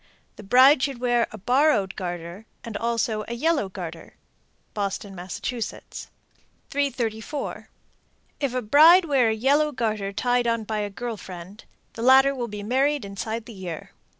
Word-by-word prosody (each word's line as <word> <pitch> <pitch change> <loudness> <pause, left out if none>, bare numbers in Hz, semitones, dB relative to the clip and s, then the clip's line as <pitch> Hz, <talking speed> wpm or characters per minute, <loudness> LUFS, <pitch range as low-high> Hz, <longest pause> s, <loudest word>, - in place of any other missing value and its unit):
The - - -11
bride 255 +7 +6
should 275 -2 -1
wear 240 -1 +2
a 220 - -8
borrowed 245 -2 +2
garter, 175 +3 -6 0.2
and 230 -3 -7
also 230 -1 -1
a 235 - -4
yellow 290 -5 +1
garter. 170 -3 -8 0.6
Boston, 200 -1 -3
Mass. 180 0 -7
334. 250 +1 -5 0.7
If 275 -4 -2
a 255 - -1
bride 320 - +7
wear 270 -7 +3
a - - +1
yellow 285 +6 +2
garter 215 -6 -2
tied 245 +4 0
on 230 -1 0
by 215 0 -3
a 205 -1 -2
girl 230 +2 -5
friend, 185 +3 -10 0.3
the 230 - -7
latter 265 +3 +6
will 245 -3 -4
be 205 -2 -7
married 270 +4 +1
inside 220 +3 -5
the 235 - -10
year. 180 -5 -7
230 Hz, 150 wpm, -24 LUFS, 205-265 Hz, 0.7 s, bride